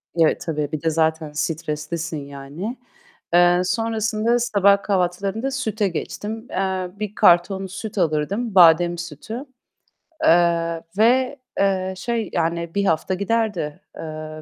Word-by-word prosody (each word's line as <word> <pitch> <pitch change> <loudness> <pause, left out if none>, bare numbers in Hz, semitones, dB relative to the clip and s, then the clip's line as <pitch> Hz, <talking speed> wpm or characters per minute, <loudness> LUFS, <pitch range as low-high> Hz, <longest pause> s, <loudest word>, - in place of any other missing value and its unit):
Evet, 165 -2 +3
tabii. 150 -3 -2
Bir 155 - -3
de 165 - +1
zaten 160 -1 0
streslisin 155 +1 -3
yani. 140 - -7 0.6
Eee, 175 0 +5
sonrasında 225 +2 0
sabah 200 -3 +3
kahvaltılarında 195 +6 -1
süte 220 -6 -1
geçtim. 215 +6 -5
Eee, 185 -1 -2
1 210 -1 -4
karton 190 +3 +4
süt 210 +4 -7
alırdım; 185 +7 0
badem 175 0 +6
sütü. 170 - -7 0.8
Eee, 170 -1 +3 0.2
ve, 255 +5 +3 0.2
eee, 190 -1 +1
şey 230 +3 -2
yani 170 0 -1
1 200 0 +1
hafta 165 +2 +1
giderdi, 200 -6 -1 0.2
eee, 155 -1 -7
180 Hz, 120 wpm, -22 LUFS, 165-210 Hz, 0.8 s, badem